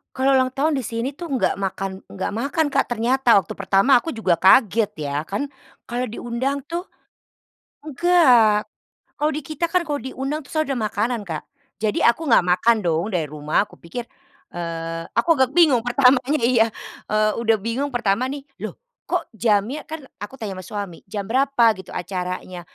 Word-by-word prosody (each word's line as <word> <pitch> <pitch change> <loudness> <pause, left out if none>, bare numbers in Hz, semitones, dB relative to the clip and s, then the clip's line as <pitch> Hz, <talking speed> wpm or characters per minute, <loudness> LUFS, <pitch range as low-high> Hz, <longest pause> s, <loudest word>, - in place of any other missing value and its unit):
Kalau 270 +1 +2
ulang 260 -1 +3
tahun 290 +4 0
di 265 - 0
sini 235 +4 -3
tuh 340 +2 -8
nggak - - +1
makan 195 0 -2 0.2
nggak 190 +1 -4
makan 280 +8 0
Kak, - - +1
ternyata, 240 0 +3
waktu 190 - -1
pertama 195 +6 +2
aku - - -5
juga 225 - +1
kaget 215 +2 +5 0.2
ya. 140 +1 -1
Kan 200 - -3 0.4
kalau 245 0 -3
diundang 255 +5 -3
tuh 340 +3 -3 1.1
enggak, 255 -9 +4 0.5
kalau 300 +1 +1
di 305 - -3
kita 310 +3 -3
kan 360 +2 +1
kalau 300 -4 -2
diundang 270 +2 -4
tuh - - -13
selalu 310 -1 0
udah - - -2
makanan 220 +3 -1
Kak, 160 -4 -5 0.4
jadi 215 -1 +1
aku 320 +3 -6
gak 225 - +5
makan 185 +6 +3
dong 165 +4 0
dari 175 -6 -1
rumah, 150 +6 0
aku - - -23
pikir, 225 +8 -6 0.5
eee, 165 -1 -4
aku 235 - +2
agak 260 -3 +2
bingung 295 -9 +5
pertamanya, 255 +3 +3
iya, 235 -2 +4 0.4
eee, 215 0 +2
udah 225 -1 +3
bingung 230 +7 -2
pertama 245 -1 0
nih, 280 0 -6 0.2
loh, - - -5 0.3
kok - - 0
jamnya 220 +5 +1
kan 315 -3 -7 0.2
aku 210 +6 -7
tanya 215 -5 -5
sama - - -13
suami, 200 -5 -5
"Jam 200 -1 -4
berapa 245 0 +3
gitu, 185 - -18
acaranya?" 180 0 -5
235 Hz, 175 wpm, -22 LUFS, 200-275 Hz, 1.1 s, kaget